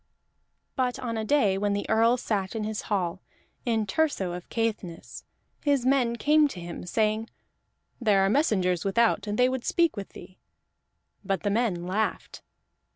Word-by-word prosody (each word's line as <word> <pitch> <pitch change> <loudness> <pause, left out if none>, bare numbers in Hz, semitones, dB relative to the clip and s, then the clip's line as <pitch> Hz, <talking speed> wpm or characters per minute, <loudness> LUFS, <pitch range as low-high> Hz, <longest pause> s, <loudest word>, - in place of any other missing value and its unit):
But 255 -2 0
on 245 -3 -4
a 220 - -2
day 215 -6 +2
when 205 0 0
the 205 - -2
Earl 230 +2 +3
sat 200 -4 -2
in 220 - -2
his 215 0 -3
hall, 190 -3 -1 0.5
in 225 -2 +1
Thurso 205 - 0
of 175 0 -7
Caithness, 220 -7 -4 0.4
his 280 -4 +2
men 255 -3 +2
came 300 +4 +4
to 195 - -8
him, 175 0 -7
saying: 215 +3 0 0.7
"There 205 -5 +3
are - - +3
messengers 190 - +2
without, 220 +3 +2
and 205 0 -2
they 250 - +5
would 255 -1 -2
speak 335 -2 +2
with 200 -2 -7
thee." 185 +1 -13 0.8
But 195 -1 -2
the 205 - +1
men 200 -6 0
laughed. 205 +4 -2
220 Hz, 160 wpm, -27 LUFS, 195-245 Hz, 0.8 s, they